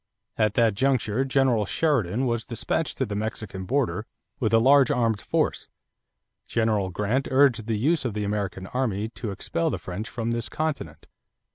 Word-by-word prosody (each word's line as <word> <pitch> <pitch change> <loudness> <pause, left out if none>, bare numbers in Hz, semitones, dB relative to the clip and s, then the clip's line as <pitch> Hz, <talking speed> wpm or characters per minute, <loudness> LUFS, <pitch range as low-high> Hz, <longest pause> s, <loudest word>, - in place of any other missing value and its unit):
At 110 -2 +1
that 115 -3 +4
juncture 130 0 +1
General 130 -6 +2
Sheridan 130 - +1
was 115 -2 0
dispatched 115 - -2
to - - 0
the 105 - -5
Mexican 105 -2 -4
border 120 -1 -1 0.3
with 110 - +1
a 115 - +6
large 135 +4 +5
armed 115 -4 +1
force; - - -1 0.8
General 110 -4 +1
Grant 105 +9 -1
urged 130 -5 +3
the 110 -2 0
use 155 +9 +2
of 120 -5 -3
the 105 - -1
American 100 -2 -2
army 110 -3 -2
to 115 -1 -6
expel 165 - -1
the - - -2
French 95 +5 -6
from 115 -1 -3
this 115 0 -2
continent. 155 -1 -3
115 Hz, 165 wpm, -25 LUFS, 105-130 Hz, 0.8 s, a